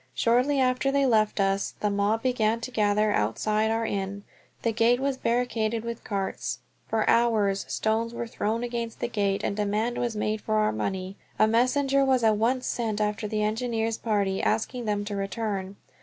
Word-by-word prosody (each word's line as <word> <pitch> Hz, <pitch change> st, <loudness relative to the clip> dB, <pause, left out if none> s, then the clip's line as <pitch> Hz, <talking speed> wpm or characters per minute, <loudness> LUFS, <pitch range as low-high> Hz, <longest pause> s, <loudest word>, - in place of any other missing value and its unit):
Shortly 250 Hz, +5 st, +2 dB
after 255 Hz, +1 st, +2 dB
they 280 Hz, 0 st, +2 dB
left 215 Hz, -4 st, +2 dB
us 195 Hz, 0 st, 0 dB
the 210 Hz, -, 0 dB
mob 205 Hz, +2 st, +1 dB
began 230 Hz, -3 st, +1 dB
to 255 Hz, -, -5 dB
gather 210 Hz, -1 st, +2 dB
outside 210 Hz, -, +1 dB
our 225 Hz, +1 st, 0 dB
inn. 200 Hz, -1 st, -3 dB, 0.4 s
The 230 Hz, -, +2 dB
gate 230 Hz, +2 st, +3 dB
was 275 Hz, 0 st, 0 dB
barricaded 230 Hz, -3 st, 0 dB
with 235 Hz, 0 st, -5 dB
carts. 195 Hz, -2 st, -3 dB, 0.3 s
For 220 Hz, -1 st, 0 dB
hours 215 Hz, -4 st, +2 dB
stones 225 Hz, +1 st, 0 dB
were 235 Hz, 0 st, -4 dB
thrown 230 Hz, 0 st, -2 dB
against 235 Hz, -1 st, -4 dB
the -, -, -1 dB
gate 200 Hz, -4 st, -1 dB
and 200 Hz, -, -1 dB
demand 210 Hz, +3 st, -1 dB
was 240 Hz, -2 st, -1 dB
made 215 Hz, 0 st, -1 dB
for 215 Hz, -, -1 dB
our 215 Hz, 0 st, +3 dB
money. 185 Hz, -, -3 dB, 0.2 s
A -, -, +5 dB
messenger 270 Hz, +4 st, +2 dB
was 260 Hz, -3 st, +2 dB
at 215 Hz, -1 st, +4 dB
once 250 Hz, +4 st, +1 dB
sent 220 Hz, -3 st, -2 dB
after 210 Hz, 0 st, -1 dB
the 215 Hz, 0 st, -1 dB
engineers' 225 Hz, 0 st, -1 dB
party, 200 Hz, -4 st, 0 dB
asking 230 Hz, +3 st, -1 dB
them 205 Hz, -1 st, -1 dB
to 205 Hz, -1 st, -4 dB
return. 195 Hz, -1 st, -3 dB
220 Hz, 180 wpm, -26 LUFS, 205-235 Hz, 0.4 s, A